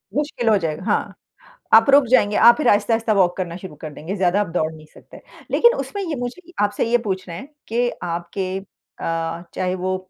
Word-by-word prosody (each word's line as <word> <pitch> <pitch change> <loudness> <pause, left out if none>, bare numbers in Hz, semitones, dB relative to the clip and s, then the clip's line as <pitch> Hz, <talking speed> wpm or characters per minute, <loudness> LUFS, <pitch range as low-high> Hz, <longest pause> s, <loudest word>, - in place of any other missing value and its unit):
मुश्किल 285 -6 -1
हो 215 - +5
जाएगा 165 -2 -3
हाँ, 210 +1 -1 0.6
आप 225 +5 +7
रुक 280 0 +6
जाएँगे, 210 -4 +3
आप 235 0 +7
फिर 305 - 0
आहिस्ता-आहिस्ता 225 +2 +2
वॉक 185 -3 +3
करना 175 -2 -4
शुरू 185 -4 -10
कर 155 -2 -7
देंगे। 175 +7 -6
ज़्यादा 190 +1 +2
आप 205 - -2
दौड़ 160 -2 0
नहीं 155 0 -14
सकते। - - -15 0.3
लेकिन 475 +1 +5
उसमें 405 - -4
ये 330 -5 -3
मुझे 245 +8 -5 0.2
आपसे 205 +1 0
ये 240 - +4
पूछना 185 -2 -3
है 185 +12 -8 0.2
कि 240 +2 0
आपके 180 +2 -3
अ, 165 -3 -6
चाहे 185 0 -1
वो 185 0 -2
195 Hz, 195 wpm, -21 LUFS, 175-235 Hz, 0.6 s, आप